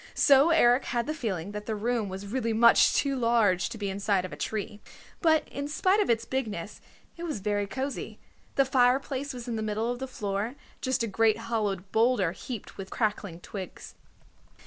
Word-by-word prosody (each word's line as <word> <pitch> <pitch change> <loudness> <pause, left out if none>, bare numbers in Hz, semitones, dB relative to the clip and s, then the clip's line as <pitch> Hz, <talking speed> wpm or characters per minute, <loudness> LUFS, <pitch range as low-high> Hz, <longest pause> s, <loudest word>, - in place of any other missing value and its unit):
So 280 +2 +6
Eric 250 -6 +4
had 240 -1 -1
the 305 - -2
feeling 205 - -3
that 210 0 -7
the 220 - -1
room 225 -1 -1
was 190 +1 -6
really 230 +2 -1
much 235 +1 +6
too 280 -1 +1
large 230 -7 +2
to - - -7
be 205 -2 -3
inside 195 -1 0
of 185 - -7
a - - -5
tree. 210 -1 -4 0.4
But 320 -3 +3
in 280 +1 -4
spite 375 +7 +2
of - - -1
its 230 -1 +2
bigness, 215 -8 -4 0.4
it - - -9
was 310 -10 -3
very 205 0 -1
cozy. 265 +6 -4 0.4
The 275 - +4
fireplace 265 +2 +1
was 250 -2 -8
in 235 -2 -2
the - - -2
middle 215 +2 -1
of 245 - -5
the 265 - -4
floor, 210 0 -3 0.3
just 260 -3 0
a - - -1
great 220 +1 +2
hollowed 210 -5 -2
boulder, 225 -6 +3
heaped 215 +4 -8
with 190 -1 -7
crackling 205 -6 -2
twigs. 190 -2 -8
225 Hz, 190 wpm, -28 LUFS, 205-260 Hz, 0.4 s, So